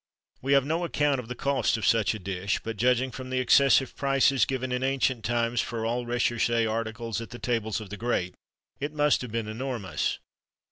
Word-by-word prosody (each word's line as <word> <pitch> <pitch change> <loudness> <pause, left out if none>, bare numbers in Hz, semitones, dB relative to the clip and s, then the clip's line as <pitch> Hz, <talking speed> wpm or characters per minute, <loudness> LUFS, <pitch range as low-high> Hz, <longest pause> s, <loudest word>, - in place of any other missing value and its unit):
We 135 +2 +1
have 140 -1 +4
no 165 +4 -1
account 145 -5 +1
of 120 - -7
the 125 - -5
cost 140 -3 +1
of 110 - -3
such 110 -1 +3
a - - -6
dish, 95 0 -2
but, 115 0 -4
judging 125 +4 +2
from 130 0 -8
the 130 - -1
excessive 135 +1 +4
prices 135 -2 +3
given 130 -1 -3
in 125 0 -1
ancient 130 -3 0
times 120 0 +1
for 115 -1 -4
all 120 +1 -1
recherché 120 -1 +1
articles 115 0 -3
at 115 - -8
the 120 - -8
tables 115 -4 -1
of 105 -3 -9
the 105 - -5
great, 95 -6 -1 0.5
it 145 +2 -3
must 150 -1 +3
have 125 -3 -6
been 115 -1 -2
enormous. 110 - -3
120 Hz, 200 wpm, -27 LUFS, 115-130 Hz, 0.5 s, have